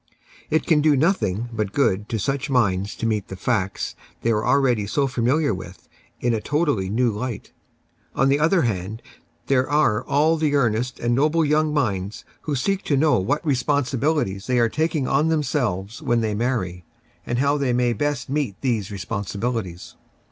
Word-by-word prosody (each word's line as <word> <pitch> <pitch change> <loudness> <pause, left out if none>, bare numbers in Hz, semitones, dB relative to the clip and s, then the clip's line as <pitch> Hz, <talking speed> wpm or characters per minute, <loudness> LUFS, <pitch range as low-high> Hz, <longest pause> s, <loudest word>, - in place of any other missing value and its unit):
It 155 - +1
can 155 -3 +3
do 150 -2 +4
nothing 120 - +1
but 105 -3 -2
good 105 -6 +1
to 115 - -1
such 135 +7 -2
minds 100 -6 +1
to - - -4
meet 105 -3 -1
the 95 - -7
facts 100 -1 -2 0.3
they 115 - +2
are 105 -1 +1
already 125 -7 +2
so 140 +7 +1
familiar 130 +2 +1
with 90 0 -9 0.3
in 120 -1 +1
a 110 - -1
totally 145 - 0
new 120 +3 +2
light. 110 +1 -5 0.6
On 135 - +3
the 140 +1 +3
other 165 +2 +3
hand, 105 0 -3 0.4
there 130 -1 +1
are 145 -7 +2
all 155 +3 +2
the 155 -2 +1
earnest 125 -1 0
and 120 0 0
noble 155 +5 +2
young 150 +1 +2
minds 105 -8 -2 0.2
who 150 - -2
seek 195 +9 0
to 140 - +1
know 150 -5 +3
what 145 - -1
responsibilities 140 -6 0
they 125 -1 +1
are 115 -1 +3
taking 155 -1 0
on 155 - +2
themselves 125 - -1
when 120 -1 +1
they 110 -2 -1
marry, 105 -6 -2 0.4
and 120 - -2
how 140 +3 +2
they 135 -3 +1
may 120 0 +2
best 135 +1 -2
meet 135 -8 -2
these 115 -7 -1
responsibilities. 100 -1 -4
125 Hz, 175 wpm, -23 LUFS, 105-145 Hz, 0.6 s, do